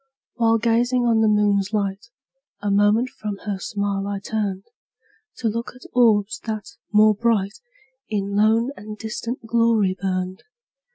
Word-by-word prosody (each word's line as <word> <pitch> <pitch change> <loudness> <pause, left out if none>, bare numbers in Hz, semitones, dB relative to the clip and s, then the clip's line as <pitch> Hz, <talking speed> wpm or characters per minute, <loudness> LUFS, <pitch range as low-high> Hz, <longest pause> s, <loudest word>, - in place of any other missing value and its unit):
While 230 -1 +3
gazing 240 +2 +2
on 230 -2 +3
the 220 - +4
moon's 205 -1 +2
light, 200 +1 -2 0.5
A 205 0 -1
moment 205 +5 +3
from 210 -4 -6
her 200 -2 -2
smile 200 -1 -2
I 200 0 -2
turned, 200 -2 -3 0.7
To 235 - -2
look 230 +2 -3
at 250 - -15
orbs, 215 -4 +3
that, 215 -2 -4 0.2
more 215 0 +6
bright, 210 -2 0 0.5
In 200 -2 -2
lone 220 +4 +3
and 210 +1 -9
distant 230 +2 -5
glory 225 -4 +2
burned. 185 -1 -2
215 Hz, 145 wpm, -22 LUFS, 200-230 Hz, 0.7 s, more